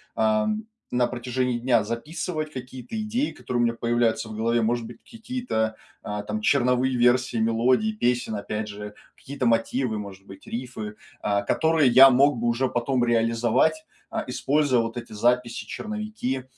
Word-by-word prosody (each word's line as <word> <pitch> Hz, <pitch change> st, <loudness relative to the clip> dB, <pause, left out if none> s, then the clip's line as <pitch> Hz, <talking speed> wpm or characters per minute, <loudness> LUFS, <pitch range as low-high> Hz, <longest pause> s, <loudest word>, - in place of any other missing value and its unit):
ам, 215 Hz, 0 st, +1 dB, 0.3 s
на 125 Hz, 0 st, +2 dB
протяжении 125 Hz, 0 st, -2 dB
дня 120 Hz, -3 st, +2 dB
записывать 155 Hz, -, -4 dB
какие-то 130 Hz, -, -7 dB
идеи, 235 Hz, +7 st, -1 dB
которые 120 Hz, -1 st, -3 dB
у -, -, +4 dB
меня 115 Hz, -, +1 dB
появляются 115 Hz, -1 st, 0 dB
в 110 Hz, -, -7 dB
голове, 115 Hz, +1 st, +1 dB
может 115 Hz, +1 st, 0 dB
быть, -, -, -11 dB
какие-то, 225 Hz, -, -3 dB, 0.3 s
а, 105 Hz, 0 st, -4 dB
там 105 Hz, +1 st, -4 dB
черновые 125 Hz, +2 st, +2 dB
версии 125 Hz, 0 st, +3 dB
мелодий, 120 Hz, -, +2 dB
песен 120 Hz, -, 0 dB
опять 105 Hz, +1 st, -4 dB
же, 105 Hz, 0 st, -8 dB, 0.2 s
какие-то 135 Hz, -3 st, -3 dB
мотивы, 115 Hz, 0 st, +1 dB
может 100 Hz, -1 st, -9 dB
быть, 95 Hz, 0 st, -13 dB
рифы, 115 Hz, -4 st, -6 dB, 0.3 s
а, 100 Hz, -1 st, +1 dB
которые 160 Hz, +5 st, +2 dB
я 130 Hz, +2 st, +9 dB
мог 140 Hz, +1 st, +4 dB
бы 120 Hz, -, -2 dB
уже 125 Hz, +2 st, +1 dB
потом 120 Hz, +1 st, 0 dB
реализовать, 115 Hz, -, +2 dB, 0.3 s
а, -, -, -2 dB
используя 140 Hz, -4 st, +2 dB
вот 115 Hz, 0 st, -4 dB
эти 120 Hz, -2 st, -7 dB
записи, 120 Hz, +2 st, 0 dB
черновики 215 Hz, -, -4 dB
120 Hz, 155 wpm, -25 LUFS, 115-135 Hz, 0.3 s, я